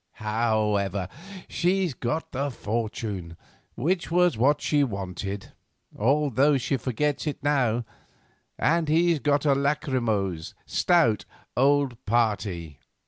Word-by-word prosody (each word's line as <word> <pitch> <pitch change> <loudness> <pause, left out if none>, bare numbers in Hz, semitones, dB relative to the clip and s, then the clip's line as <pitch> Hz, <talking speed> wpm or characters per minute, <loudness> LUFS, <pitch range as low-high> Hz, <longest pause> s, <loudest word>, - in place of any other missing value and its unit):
However, 105 -3 0 0.4
she's 180 -2 +1
got 140 +7 -3
the 140 +2 -1
fortune, 105 -7 -4 0.4
which 170 +7 0
was 180 +1 +3
what 140 +6 +3
she 145 -1 +2
wanted, 100 -3 -4 0.4
although 140 +3 +3
she 135 +1 -1
forgets 145 +6 -1
it 145 -1 -4
now, 125 -5 +1 0.7
and 165 -1 +2
he's 165 0 +3
got 145 +1 +1
a 140 - +5
lachrymose, 125 - -1
stout, 125 - +2 0.3
old 135 -1 +2
party. 105 - 0
130 Hz, 105 wpm, -26 LUFS, 105-150 Hz, 0.7 s, a